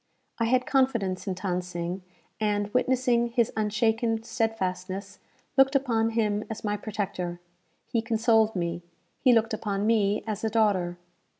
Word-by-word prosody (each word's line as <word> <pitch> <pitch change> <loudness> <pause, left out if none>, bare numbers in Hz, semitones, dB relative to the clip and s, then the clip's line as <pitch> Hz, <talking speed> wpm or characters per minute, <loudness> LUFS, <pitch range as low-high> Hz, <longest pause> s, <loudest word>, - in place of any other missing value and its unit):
I 230 - +2
had 250 +2 +2
confidence 235 -9 +1
in 190 - -1
Than 180 -1 -1
Sing, 180 +1 -4 0.4
and, 205 -1 0
witnessing 250 -1 +2
his 235 -1 +1
unshaken 220 +1 +1
stedfastness, 195 -5 -3 0.4
looked 270 +1 +5
upon 230 -5 +2
him 210 -2 +1
as 220 - -6
my 210 -1 0
protector. 195 -5 -4 0.5
He 230 - 0
consoled 225 -1 +2
me; 170 -1 -2 0.4
he 255 - +5
looked 225 -1 +3
upon 205 -2 -2
me 210 -2 +2
as 215 -1 -4
a 220 - +1
daughter. 200 -6 +1
215 Hz, 140 wpm, -27 LUFS, 195-230 Hz, 0.5 s, looked